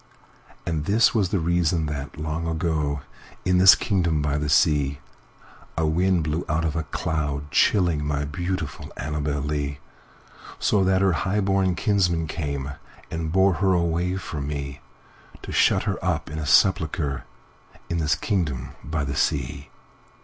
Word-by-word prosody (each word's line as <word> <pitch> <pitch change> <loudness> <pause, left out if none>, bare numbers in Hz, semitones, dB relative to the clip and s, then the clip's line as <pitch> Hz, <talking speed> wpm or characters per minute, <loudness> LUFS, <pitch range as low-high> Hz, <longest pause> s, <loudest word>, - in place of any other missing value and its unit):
And 80 -3 -2
this 110 +6 +4
was 100 -5 +1
the 100 - 0
reason 85 -1 +1
that, 70 -2 -5
long 80 +2 -3
ago, 80 -3 -1 0.4
In 90 0 +3
this 95 0 +9
kingdom 85 -6 0
by 75 0 0
the 75 -1 -2
sea,A 70 +2 -1
wind 90 +2 +2
blew 75 +2 -1
out 80 +1 +1
of 80 -1 -1
a 80 - 0
cloud, 75 -2 -3
chillingMy 75 -6 +2
beautiful 90 -2 -4
Annabel 75 -1 -2
Lee; 70 -1 -2 0.8
So 100 -2 +2
that 95 0 +3
her 95 -2 +3
highborn 95 +1 +1
kinsmen 90 -6 +1
cameAnd 75 +2 -5
bore 95 +2 +4
her 95 -1 +4
away 85 +1 0
from 75 -7 -5
me, 70 -1 -5 0.6
To - - -7
shut - - +3
her - - -3
up - - -1
in 80 - -4
a 75 - -4
sepulchreIn 80 -8 +2 0.7
this 75 -3 +1
kingdom 75 - -2
by 75 +2 -2
the 70 0 -3
sea. 70 0 -1
80 Hz, 140 wpm, -24 LUFS, 75-90 Hz, 0.8 s, this